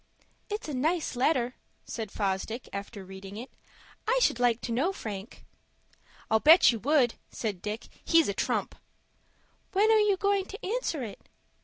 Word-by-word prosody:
"It's 420 Hz, -2 st, -4 dB
a 300 Hz, -, -4 dB
nice 310 Hz, +4 st, 0 dB
letter," 250 Hz, -1 st, +2 dB, 0.3 s
said 225 Hz, -3 st, -5 dB
Fosdick, 205 Hz, +4 st, -2 dB
after 200 Hz, 0 st, -6 dB
reading 195 Hz, +1 st, -9 dB
it. 245 Hz, +4 st, -8 dB, 0.6 s
"I -, -, +3 dB
should 245 Hz, -, +2 dB
like 240 Hz, -2 st, +3 dB
to 235 Hz, -, -4 dB
know 275 Hz, +11 st, +1 dB
Frank." 210 Hz, -, -7 dB, 0.9 s
"I'll 220 Hz, -, +5 dB
bet 315 Hz, 0 st, +8 dB
you 230 Hz, -, -4 dB
would," 265 Hz, 0 st, +3 dB, 0.2 s
said 205 Hz, -6 st, -4 dB
Dick. 215 Hz, +2 st, -4 dB, 0.2 s
"He's 330 Hz, -1 st, +4 dB
a 200 Hz, -, 0 dB
trump." -, -, -1 dB, 1.0 s
"When 415 Hz, +3 st, +4 dB
are 440 Hz, -, +6 dB
you 415 Hz, -2 st, +3 dB
going 400 Hz, -1 st, +1 dB
to 410 Hz, -, -9 dB
answer 390 Hz, -, -1 dB
it?" 215 Hz, -4 st, -9 dB
245 Hz, 160 wpm, -29 LUFS, 215-360 Hz, 1.0 s, bet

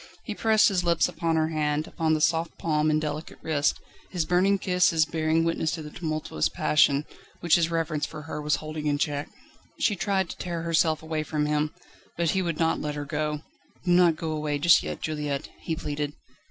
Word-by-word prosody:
He 215 Hz, -, -4 dB
pressed 220 Hz, 0 st, +4 dB
his 185 Hz, -3 st, 0 dB
lips 170 Hz, -1 st, +3 dB
upon 165 Hz, -1 st, -1 dB
her 160 Hz, 0 st, +2 dB
hand, 150 Hz, -1 st, 0 dB
upon 160 Hz, -1 st, 0 dB
the 155 Hz, -, -2 dB
soft 165 Hz, +1 st, +1 dB
palm 155 Hz, -1 st, +1 dB
and 155 Hz, 0 st, +2 dB
delicate 155 Hz, +1 st, -5 dB
wrist, 145 Hz, -2 st, +1 dB, 0.3 s
his 175 Hz, -4 st, -1 dB
burning 185 Hz, +4 st, +3 dB
kisses 180 Hz, -4 st, +3 dB
bearing 160 Hz, 0 st, +1 dB
witness 165 Hz, -1 st, 0 dB
to 160 Hz, -, -4 dB
the 150 Hz, -, -9 dB
tumultuous 155 Hz, -, -2 dB
passion, 145 Hz, -, +3 dB, 0.4 s
which 170 Hz, -, +1 dB
his 170 Hz, -1 st, +2 dB
reverence 160 Hz, -3 st, -1 dB
for 150 Hz, -, -9 dB
her 150 Hz, 0 st, -5 dB
was 150 Hz, -1 st, +2 dB
holding 155 Hz, +1 st, -5 dB
in 145 Hz, -1 st, +2 dB
check. 145 Hz, -1 st, -2 dB, 0.5 s
She 205 Hz, -, +2 dB
tried 190 Hz, -1 st, 0 dB
to -, -, -7 dB
tear 170 Hz, -2 st, -4 dB
herself 160 Hz, -1 st, +2 dB
away 160 Hz, -1 st, -2 dB
from 150 Hz, 0 st, -1 dB
him, 150 Hz, 0 st, 0 dB, 0.5 s
but 170 Hz, -2 st, +2 dB
he 190 Hz, -, +1 dB
would 170 Hz, -4 st, -2 dB
not 165 Hz, -1 st, +1 dB
let 150 Hz, -1 st, -3 dB
her 145 Hz, 0 st, -4 dB
go: 150 Hz, +1 st, -2 dB, 0.4 s
"Do 180 Hz, -, +2 dB
not 175 Hz, -2 st, +5 dB
go 160 Hz, 0 st, -4 dB
away 150 Hz, -1 st, -1 dB
just 165 Hz, +3 st, +6 dB
yet, -, -, -5 dB
Juliette," 150 Hz, -2 st, -3 dB
he 160 Hz, -, -3 dB
pleaded. 145 Hz, -2 st, -3 dB
155 Hz, 205 wpm, -26 LUFS, 150-170 Hz, 0.5 s, just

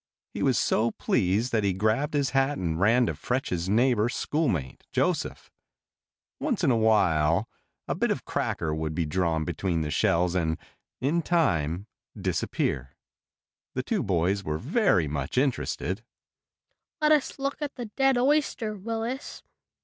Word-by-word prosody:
He -, -, -4 dB
was -, -, +3 dB
so 115 Hz, +2 st, +2 dB
pleased 105 Hz, +2 st, 0 dB
that 110 Hz, -2 st, +1 dB
he 100 Hz, -2 st, +2 dB
grabbed 110 Hz, +10 st, 0 dB
his 140 Hz, -2 st, +1 dB
hat 135 Hz, +1 st, +2 dB
and 80 Hz, -3 st, -2 dB
ran 115 Hz, +6 st, +4 dB
to 90 Hz, -, -1 dB
fetch 125 Hz, -, -2 dB
his 90 Hz, 0 st, -2 dB
neighbor 120 Hz, +1 st, +3 dB
schoolmate, 120 Hz, -, -1 dB
Joseph. -, -, -1 dB, 0.9 s
Once -, -, -1 dB
in -, -, +4 dB
a -, -, +3 dB
while 95 Hz, -5 st, +3 dB, 0.4 s
a -, -, 0 dB
bit -, -, 0 dB
of -, -, -2 dB
cracker 80 Hz, -1 st, -1 dB
would 80 Hz, 0 st, -3 dB
be 85 Hz, -, 0 dB
drawn 80 Hz, 0 st, 0 dB
between 85 Hz, 0 st, -1 dB
the 75 Hz, -1 st, -2 dB
shells 85 Hz, +3 st, +2 dB
and, 80 Hz, -3 st, 0 dB, 0.4 s
in 150 Hz, +6 st, +1 dB
time, 90 Hz, -, +1 dB, 0.3 s
disappear. 65 Hz, -2 st, -2 dB, 0.8 s
The 130 Hz, -, -1 dB
two 215 Hz, -, 0 dB
boys 95 Hz, -, +1 dB
were 75 Hz, -2 st, -2 dB
very 140 Hz, -, +2 dB
much 75 Hz, -, -3 dB
interested. 110 Hz, -, 0 dB, 1.0 s
"Let 305 Hz, -1 st, +3 dB
us 300 Hz, -3 st, +2 dB
look 275 Hz, +2 st, -3 dB
at 290 Hz, -1 st, -3 dB
the 245 Hz, -, -5 dB
dead 270 Hz, +4 st, +2 dB
oyster, 255 Hz, -5 st, +1 dB
Willis." 225 Hz, +6 st, -4 dB
110 Hz, 150 wpm, -27 LUFS, -, 1.0 s, ran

